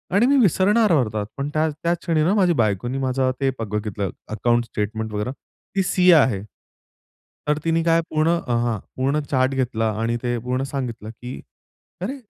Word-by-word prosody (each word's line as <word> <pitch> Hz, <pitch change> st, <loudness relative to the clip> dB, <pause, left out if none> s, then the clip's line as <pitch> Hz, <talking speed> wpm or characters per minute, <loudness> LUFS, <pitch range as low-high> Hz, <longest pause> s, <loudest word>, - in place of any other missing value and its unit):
आणि 210 Hz, +4 st, +5 dB
मी 280 Hz, +2 st, +4 dB
विसरणार 205 Hz, +2 st, +3 dB
होतो 110 Hz, -9 st, +1 dB
पण 140 Hz, +1 st, -2 dB
त्या 155 Hz, +1 st, +2 dB
त्याच 170 Hz, +3 st, -1 dB
क्षणी 160 Hz, -2 st, +1 dB
ना 180 Hz, -, +3 dB
माझ्या 180 Hz, -5 st, +3 dB
बायकोने 115 Hz, +3 st, 0 dB
माझं 130 Hz, -1 st, +1 dB
ते 135 Hz, -1 st, +2 dB
ब -, -, -1 dB
बघितलं 105 Hz, -2 st, -2 dB, 0.2 s
अकाउंट 120 Hz, +2 st, +1 dB
स्टेटमेंट 110 Hz, 0 st, -3 dB
वगैरे, 105 Hz, +5 st, -2 dB, 0.4 s
ती 195 Hz, -, +2 dB
सीए 180 Hz, -1 st, +5 dB
आहे. 130 Hz, -10 st, +3 dB, 1.1 s
तर 150 Hz, 0 st, +2 dB
तिने 165 Hz, 0 st, +2 dB
काय 165 Hz, 0 st, +3 dB
पूर्ण 155 Hz, +1 st, +1 dB
अ 170 Hz, -8 st, 0 dB
हां 115 Hz, -4 st, -1 dB, 0.2 s
पूर्ण 135 Hz, +3 st, +1 dB
चार्ट 130 Hz, 0 st, +2 dB
घेतला 115 Hz, -4 st, 0 dB
आणि 115 Hz, +1 st, 0 dB
ते 120 Hz, -1 st, 0 dB
पूर्ण 125 Hz, +3 st, -2 dB
सांगितलं 120 Hz, -6 st, -4 dB
की, 125 Hz, +3 st, -8 dB, 0.6 s
"अरे! 230 Hz, +10 st, -3 dB
130 Hz, 175 wpm, -22 LUFS, 115-165 Hz, 1.1 s, आणि